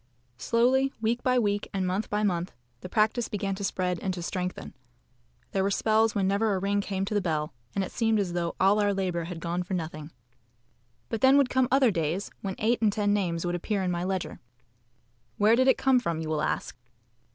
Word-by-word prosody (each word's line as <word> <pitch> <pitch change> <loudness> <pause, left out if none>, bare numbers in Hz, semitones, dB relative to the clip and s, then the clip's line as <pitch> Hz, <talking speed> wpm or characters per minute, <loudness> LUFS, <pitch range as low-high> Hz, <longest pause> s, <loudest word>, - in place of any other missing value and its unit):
Slowly, 260 +3 +2
week 230 +2 0
by 255 -1 +2
week, 205 -3 0
and 190 -1 0
month 185 +4 -2
by 210 +1 0
month, 180 -3 -1 0.3
the 185 - -9
practice 220 +3 +1
began 200 -1 -2
to 195 +1 -6
spread 180 -3 -1
and 190 - -2
to 175 - -6
strengthen. 180 +1 -4 0.8
There 195 - 0
were 195 - +1
spells 220 +2 +2
when 195 -2 +1
never 200 +1 +1
a - - -1
ring 200 +1 0
came 195 -1 -2
to 210 - -4
the 205 - +2
bell, 155 -3 -2 0.2
and 195 - +1
it - - -6
seemed 225 -2 +1
as 185 -4 -1
though 170 -1 -2
all 195 +3 +4
our 205 -1 +2
labour 180 -3 -1
had 170 -1 -6
gone 170 +1 -2
for 180 +1 -3
nothing 155 -3 -5 1.0
but 225 - -3
then 265 +1 +6
would 275 -3 +3
come 260 -1 +3
other 265 -3 +4
days 170 +2 -2
when 190 -2 -4
eight 230 +3 +1
and 215 -2 +4
ten 205 0 +1
names 175 -4 -1
would 175 - -1
appear 195 +3 -1
in 180 - 0
my 175 0 -2
ledger. 185 -1 -3 1.0
Where 215 +2 +5
did 260 +2 +3
it 265 - +5
come 265 -1 +3
from 170 -8 -2
you 160 -1 -4
will 155 -1 0
ask. 155 - -2
195 Hz, 220 wpm, -27 LUFS, 180-220 Hz, 1.0 s, then